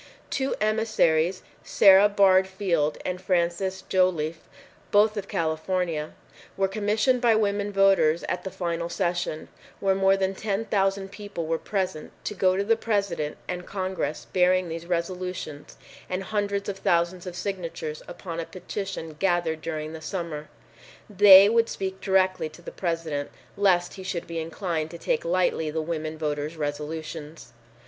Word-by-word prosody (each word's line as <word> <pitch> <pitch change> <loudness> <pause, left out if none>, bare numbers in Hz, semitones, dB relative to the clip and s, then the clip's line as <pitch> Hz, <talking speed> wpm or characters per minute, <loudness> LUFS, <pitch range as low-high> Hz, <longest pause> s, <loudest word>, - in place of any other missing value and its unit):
Two 270 0 0
emissaries, 205 -6 +2 0.2
Sara 195 +1 +6
Bard 190 -2 +5
Field 175 -6 0
and 180 0 -3
Frances 185 +1 0
Joliffe, 170 -4 0 0.4
both 210 +1 +4
of 200 -2 -4
California, 165 -2 -1 0.4
were 195 0 +2
commissioned 215 +5 +1
by 235 -3 +4
women 205 -1 0
voters 195 -5 +4
at 180 - -3
the 190 - -4
final 170 -2 -3
session, 175 -3 -2 0.3
when 195 -1 +2
more 195 0 +4
than 190 0 0
ten 205 +2 -2
thousand 195 -2 0
people 200 -5 -6
were 165 0 -1
present, 185 -6 -3
to - - -3
go 185 -1 +2
to 200 - +1
the 225 +3 +3
President 200 -9 -1
and 180 0 -5
Congress 185 -5 -3
bearing 185 -1 +3
these 165 +1 -6
resolutions 175 -3 -4 0.3
and 185 +1 -2
hundreds 200 0 -2
of 195 -1 -4
thousands 175 +1 +1
of 180 - -6
signatures 170 -5 -4
upon 170 -1 -6
a 165 - -3
petition 185 -2 -6
gathered 175 -4 +1
during 155 -1 -4
the 160 - -8
summer. 160 -3 -5 0.6
They 200 -1 +9
would 230 +1 +3
speak 190 0 -4
directly 185 -4 +2
to 155 +3 -16
the - - -7
President 165 -5 -3 0.3
lest 185 -3 +2
he 190 - -9
should 185 -2 -3
be 165 -1 -4
inclined 165 -1 -3
to 170 - -8
take 160 - -1
lightly 170 -2 +1
the 160 +1 -2
women 155 -1 -3
voters' 150 +1 -3
resolutions. 150 -1 -5
185 Hz, 150 wpm, -26 LUFS, 165-195 Hz, 0.6 s, They